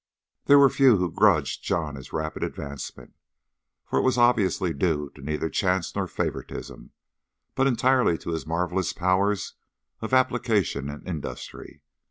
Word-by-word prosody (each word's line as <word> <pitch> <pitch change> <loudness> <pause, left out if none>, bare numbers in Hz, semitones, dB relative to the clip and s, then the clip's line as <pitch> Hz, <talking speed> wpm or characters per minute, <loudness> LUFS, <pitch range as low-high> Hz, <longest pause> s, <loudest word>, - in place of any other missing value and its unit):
There 145 - +7
were 140 -2 +6
few 130 -6 +5
who 90 -2 -1
grudged - - +2
John 80 -4 -1
this 65 -2 -10
rapid 80 0 -4
advancement, 70 -1 -6 0.7
for - - 0
it - - +3
was 130 -1 +1
obviously 100 -8 +2
due 75 -6 -1
to 70 - -14
neither 75 +3 -2
chance 90 +1 -1
nor - - -1
favouritism, - - -5 0.6
but 135 - +2
entirely 125 -7 +2
to 85 - -6
his 80 -1 -4
marvellous 90 +3 -1
powers 95 +3 0 0.5
of 110 - -5
application 115 - +1
and 75 0 -9
industry. 80 -6 -7
90 Hz, 145 wpm, -25 LUFS, 80-120 Hz, 0.7 s, There